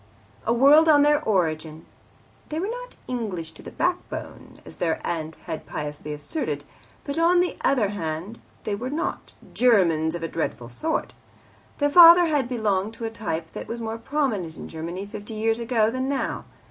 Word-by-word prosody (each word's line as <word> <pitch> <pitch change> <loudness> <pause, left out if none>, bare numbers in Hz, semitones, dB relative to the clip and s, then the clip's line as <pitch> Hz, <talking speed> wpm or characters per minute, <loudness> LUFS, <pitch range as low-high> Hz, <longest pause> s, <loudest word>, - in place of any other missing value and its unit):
A - - +3
word 280 +7 +6
on 290 -2 +6
their 295 0 +4
origin. 160 - -1 0.6
They 310 - -3
were 390 +6 -2
not - - -8
"English 200 -10 -4
to - - -14
the - - -9
backbone," 360 0 -4
as - - -11
their 165 -2 0
aunt 160 -1 -3
had 160 - -6
piously 150 0 -5
asserted. 150 - -4 0.4
But, 285 +2 -3
on 345 +2 +4
the 355 0 +1
other 245 -7 +3
band, 175 +2 -4 0.2
they 210 - -2
were 240 +6 -3
not 320 +5 -4 0.2
"Germans 175 -10 +3
of 170 - -5
the 165 - -2
dreadful 125 -8 -4
sort." 315 - -2 0.6
Their 290 0 +1
father 345 +1 +9
had 290 -6 0
belonged 215 -3 0
to 230 - -5
a 225 - -3
type 165 -8 -4
that - - -7
was 235 - -5
more 225 0 -4
prominent 230 - -2
in - - -8
Germany 170 +4 -5
fifty 210 +1 -8
years 225 +1 +1
ago 225 -2 +1
than 260 +2 -2
now. 280 -1 -2
225 Hz, 175 wpm, -24 LUFS, -, 0.6 s, father